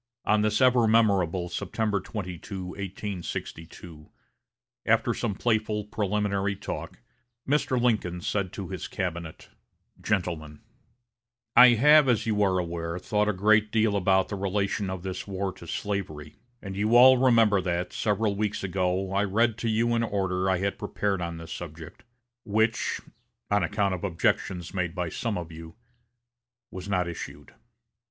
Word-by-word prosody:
On 105 0 +3
this 105 +3 +1
ever 125 -3 +5
memorable 95 -6 +2
September 105 +3 -2
22, 90 -2 -6
1862, 90 -5 -7 0.7
after - - +2
some 100 - -2
playful 110 -1 0
preliminary 100 -1 -1
talk, - - -6 0.5
Mr. 135 -3 +1
Lincoln 105 -8 0
said 95 +1 -2
to - - -6
his - - -5
cabinet: 85 -3 -5 0.5
"GENTLEMEN: 85 -7 -2 0.9
I 125 - +10
have, 150 +3 +6
as 120 -4 +2
you 105 -2 0
are 95 -2 +3
aware, 85 -1 -3
thought 105 +3 0
a - - +1
great 105 +2 +3
deal 110 -2 +2
about 95 -1 +2
the 105 - -3
relation 100 0 -1
of 95 -2 -5
this 95 0 -5
war 95 -1 -3
to 85 - -13
slavery; 80 -7 -4 0.3
and 95 -1 -6
you 105 +4 +1
all 130 +1 +8
remember 115 -6 +4
that, 90 0 -2
several 105 0 0
weeks 105 0 -2
ago, 95 0 -1
I 100 +1 +2
read 110 +3 +2
to 115 - -1
you 115 +2 +1
an 115 - +1
order 95 -4 -1
I 95 - +2
had 100 +2 -2
prepared 100 -2 -2
on 85 -1 -4
this 80 0 -8
subject, 80 -2 -9 0.4
which, 110 +1 0 0.5
on 105 0 +3
account 100 +2 0
of 90 - -5
objections 90 -1 -1
made 90 -2 -2
by 90 -2 -2
some 110 +3 -3
of 85 -1 -6
you, 80 0 -10 1.0
was 95 +1 -7
not 90 -3 +1
issued. 85 - -8
100 Hz, 150 wpm, -27 LUFS, 90-105 Hz, 1.0 s, I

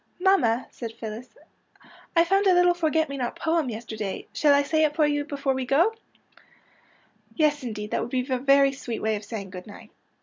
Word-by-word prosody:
" - - -42
" - - -39
Mamma," 245 -11 +3
said 230 -2 -7
Phyllis, 225 - -8 0.4
'' - - -24
I 335 - +7
found 390 +3 +2
a 370 - +5
little 355 0 +5
forget 320 -2 +1
me 280 - -6
not 245 -2 -3
poem 320 -4 0
yesterday. 220 -3 -5
Shall 295 - +3
I 285 0 +5
say 315 +2 +1
it 300 -1 +1
for 310 - +3
you 290 -1 0
before 275 -2 -1
we 260 0 -2
go? 320 - +2 0.7
" - - -33
Yes, 300 -2 +2
indeed, 215 -4 -6
that - - 0
would - - -4
be 255 0 -1
a 260 -2 -1
very 275 +1 +4
sweet 245 -4 -6
way 220 0 +1
of 210 - -6
saying 205 -2 -7
good 180 +1 -9
night." 205 - -13
275 Hz, 225 wpm, -25 LUFS, 230-315 Hz, 0.7 s, I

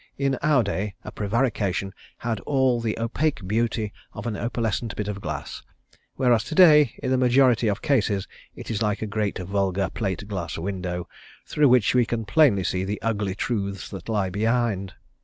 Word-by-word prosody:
In 135 -1 +1
our 150 -5 +3
day 100 0 -3
a - - -7
prevarication 105 -3 -1 0.2
had 115 -3 -2
all 130 -3 +2
of 115 - -5
the 110 -1 -1
opaque 115 -1 -1
beauty 110 0 -1 0.2
of 105 - -7
an 115 -3 -2
opalescent 115 0 -2
bit 105 - -3
of 100 -1 -4
glass, - - -5 0.5
whereas 120 -4 +3
to - - -5
day 150 -8 +7
in 130 - 0
the 130 - +3
majority 125 -2 +4
of 105 +1 -1
cases 105 -9 +1 0.3
it - - -7
is 110 -1 -2
like 105 0 0
a - - -1
great 105 -1 -2
vulgar 95 0 -1
plate 100 -3 -3
glass 95 -5 -4
window, 90 -1 -4 0.4
through 150 -2 +3
which 125 -5 +4
we 125 -2 +3
can 115 -2 -2
plainly 105 -3 +4
see 90 +1 -1
the 100 +2 -3
ugly 105 -4 -1
truths 100 -4 -3
that 95 +1 -8
lie 100 -4 0
behind. 105 -3 0
110 Hz, 180 wpm, -24 LUFS, 100-120 Hz, 0.5 s, day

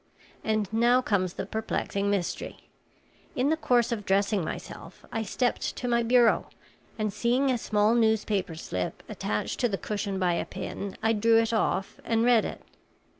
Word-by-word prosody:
And 215 -2 0
now 240 +3 +4
comes 190 -7 0
the - - -4
perplexing 200 -2 -2
mystery. 195 -4 -3 0.7
In 260 +3 +1
the - - +3
course 245 -6 +2
of 220 -3 -2
dressing 200 0 +1
myself - - -8
I 225 - -1
stepped 245 +3 -1
to 250 - -4
my 235 -1 +2
bureau, 235 -1 +4 0.5
and 215 -2 -1
seeing 245 +5 +2
a 250 - +1
small 210 0 +2
newspaper 220 -6 +1
slip 90 - -4
attached 105 - -3
to 245 - +2
the 195 - -1
cushion 205 -1 -3
by 180 -2 +2
a 170 - -1
pin, 200 -1 -6
I 225 0 +3
drew 225 +1 +4
it 225 0 +2
off 205 -3 0
and 225 0 +1
read 240 -3 +5
it. - - -6
220 Hz, 170 wpm, -27 LUFS, 200-235 Hz, 0.7 s, read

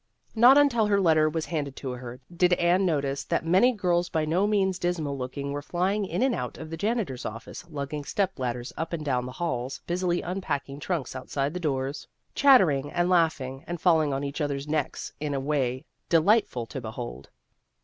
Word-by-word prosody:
Not 245 +4 +7
until 245 -7 +4
her 200 -1 +3
letter 155 -4 +4
was 160 0 -2
handed 145 -3 -3
to 130 - -5
her, 125 0 -7 0.2
did 180 0 +4
Anne 180 +2 +3
notice 140 -4 -1
that - - -1
many 190 +9 +5
girls 175 -5 0
by 155 -1 0
no 175 +6 +2
means 190 -3 +1
dismal 165 -5 -1
looking 140 +2 -4
were 145 0 -3
flying 190 +6 -1
in 240 - -1
and 265 -1 +2
out 125 - -4
of 160 0 -8
the - - -3
janitor's 200 - -2
office, 115 +10 -8
lugging 145 -1 -4
step 190 +2 -1
ladders 125 -1 -3
up 165 +1 -4
and 155 -2 -3
down 125 -3 0
the - - -6
halls, 130 -5 -3
busily 175 0 0
unpacking 145 -6 -3
trunks 150 -6 -3
outside 135 +2 -2
doors, 135 -2 -2 0.3
chattering 175 - +5
and 175 +1 +1
laugh 165 -3 +3
ing 130 +1 -7
and 175 0 -4
falling 160 -4 +3
on 135 +1 -2
each 140 +3 -4
other's 140 -1 -2
necks 150 -2 -2
in 145 -1 -2
a - - 0
way 135 -2 -1 0.2
delightful 165 - +3
to 135 +3 -7
behold. 110 - -7
155 Hz, 190 wpm, -27 LUFS, 135-180 Hz, 0.3 s, Not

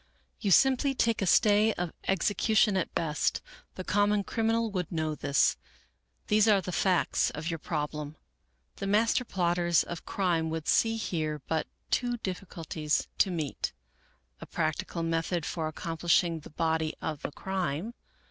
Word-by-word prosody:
You 205 - -1
simply 270 - +4
take 230 -3 +1
a 195 - 0
stay 210 +4 +5
of 175 -2 -4
execution 205 +2 +2
at 185 - -1
best. 160 -1 0 0.4
The 185 - -5
common 205 +1 +2
criminal 225 +1 0
would 180 -4 -3
know 160 -2 -1
this. 145 -1 +2 0.7
These 215 0 +3
are 205 -2 +5
the 185 -1 -5
facts 185 0 +2
of 160 +4 -4
your 165 - -4
problem. 150 -1 -4 0.6
The 195 - -4
master 225 +5 +3
plotters 175 -5 +1
of 170 -1 -7
crime 170 -4 0
would 160 -1 -4
see 225 0 +3
here 155 -8 -3
but 160 -1 -1 0.2
two 245 -1 +1
difficulties 170 -6 -3
to - - +4
meet: 160 -6 -3 0.3
" - - -37
A - - -8
practical 165 +1 -2
method 165 0 -1
for 160 -2 -2
accomplishing 165 +1 0
the - - -12
body 160 0 -1
of 155 -2 -4
the - - -4
crime. 190 +3 -3
175 Hz, 150 wpm, -29 LUFS, 160-205 Hz, 0.7 s, stay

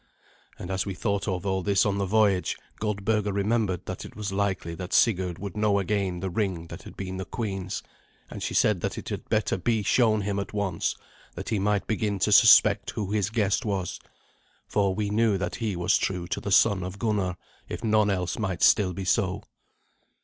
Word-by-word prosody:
And 90 - -6
as 95 0 0
we 100 -2 -5
thought 100 +2 -1
of 90 -2 -2
all 95 -1 0
this 100 +1 +2
on 100 -1 0
the 100 - -1
voyage, 100 -2 +2 0.2
Goldberga 105 0 0
remembered 100 -2 0
that - - -6
it - - -11
was 105 -2 -4
likely 95 -4 -1
that 90 +2 -6
Sigurd 95 -6 +2
would 100 -2 -7
know 105 -1 +2
again 95 -3 -1
the 95 -1 -3
ring 90 -4 -2
that - - -8
had - - -12
been 95 -1 -5
the 95 - -3
queen's, 95 -2 -4 0.4
and - - -8
she - - -3
said 105 -5 +3
that - - -3
it - - -6
had - - -6
better 110 -3 +1
be 110 +3 0
shown 110 -1 +3
him 100 0 -2
at 100 0 -5
once, 100 -5 -1 0.4
that - - -6
he 110 -3 0
might 100 0 +1
begin 105 -2 -1
to 90 - +1
suspect - - +6
who 105 -2 -4
his 105 -2 +1
guest 110 0 +1
was. 100 -5 -2 0.7
For 100 -2 +1
we 105 0 -2
knew 110 -1 +2
that 95 - -3
he 110 -5 -2
was 90 +2 +2
true 90 -2 -2
to 85 - -2
the 100 - -4
son 100 -1 +4
of 90 +2 -6
Gunnar, 100 -5 -1 0.3
if - - -6
none 105 -2 +3
else 90 -1 -1
might 95 -5 -2
still 95 -4 +4
be 95 +2 -5
so. 100 0 0
100 Hz, 205 wpm, -26 LUFS, 95-105 Hz, 0.7 s, suspect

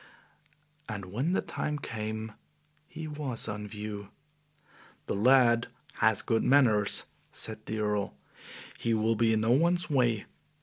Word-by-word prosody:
And 100 -3 -5
when 140 - 0
the - - +1
time 150 0 -3
came 110 -4 -5 0.6
he 160 -1 -7
was 145 -6 -3
on 105 0 -4
view. 105 -1 -6 1.0
"The - - -2
lad 115 +1 +4 0.3
has 110 -2 +3
good 115 -1 +1
manners," 115 -7 +4 0.3
said 110 -1 -5
the 110 - -3
Earl. 105 -1 -1 0.6
"He 115 -1 +1
will 110 +1 +2
be 115 0 +3
in 110 - +2
no 110 +2 +2
one's 170 +6 +2
way. 120 -6 +2
110 Hz, 135 wpm, -29 LUFS, 105-130 Hz, 1.0 s, lad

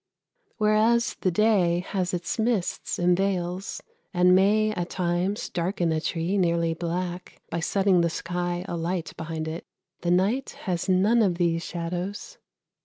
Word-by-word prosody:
Whereas 220 +2 +3
the 185 - +2
day 180 -3 +3
has 185 -3 -1
its 180 +4 -3
mists 220 -5 -1
and 175 0 +3
veils, 185 -1 -2 0.3
and 180 +1 +5
may 210 +3 +4
at 175 -4 -3
times 180 +3 -1
darken 175 -1 -1
a 160 -1 0
tree 170 +5 -1
nearly 170 -2 +2
black, 175 +2 -4
by 170 - -1
setting 190 +1 +2
the 170 - +2
sky 175 +1 -3
alight 170 0 -3
behind 160 -1 -4
it, 160 +2 -5 0.4
the 175 - -2
night 195 +9 +1
has 180 0 -2
none 205 +6 +4
of 190 -5 +2
these 170 -1 0
shadows. 180 - -5
180 Hz, 145 wpm, -26 LUFS, 170-195 Hz, 0.4 s, and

